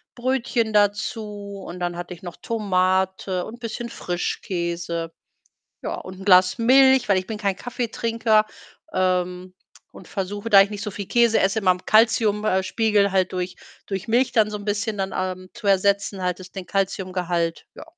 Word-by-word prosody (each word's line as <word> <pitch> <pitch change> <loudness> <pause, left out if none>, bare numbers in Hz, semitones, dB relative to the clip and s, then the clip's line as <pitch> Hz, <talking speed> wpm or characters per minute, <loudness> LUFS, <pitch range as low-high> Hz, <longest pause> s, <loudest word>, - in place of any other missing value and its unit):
Brötchen 240 -3 0
dazu 205 -1 -1
und 175 +1 -7
dann 175 -1 -2
hatte 175 +1 -6
ich 170 - -20
noch 175 -2 -7
Tomate 190 -3 0
und 220 - -8
'n - - -19
bisschen 235 0 -5
Frischkäse. 170 -2 -3 0.7
Ja, - - -3
und 185 +1 -9
'n - - -8
Glas 185 0 +5
Milch, 265 +1 +5
weil 195 - +5
ich 185 - -4
bin 220 - -4
kein 200 -3 -1
Kaffeetrinker, 230 -2 0 0.5
ähm, 185 0 -1 0.4
und 185 - -13
versuche, 205 +3 -4
da 200 -3 +8
ich 200 - -3
nicht 205 -1 -5
so 210 - -3
viel 200 +1 -6
Käse 235 -2 +4
esse, 195 +3 +1
meinem 185 -2 +1
Kalzium 215 -1 +3
äh, 190 -2 +2
Spiegel 205 -1 +2
halt 185 -1 +1
durch 180 0 -3 0.3
durch 195 +2 -5
Milch 245 +2 +2
dann 220 -3 +3
so 210 - -4
'n 205 - -9
bisschen 205 +1 -1
dann, 195 -1 -2
ähm, 185 0 -4
zu 235 -2 -9
ersetzen, 200 0 +2
halt 180 0 -1
das 185 0 -11
den 190 - -6
Kalziumgehalt, 180 -3 -2
ja. - - -10
200 Hz, 175 wpm, -23 LUFS, 185-220 Hz, 0.7 s, da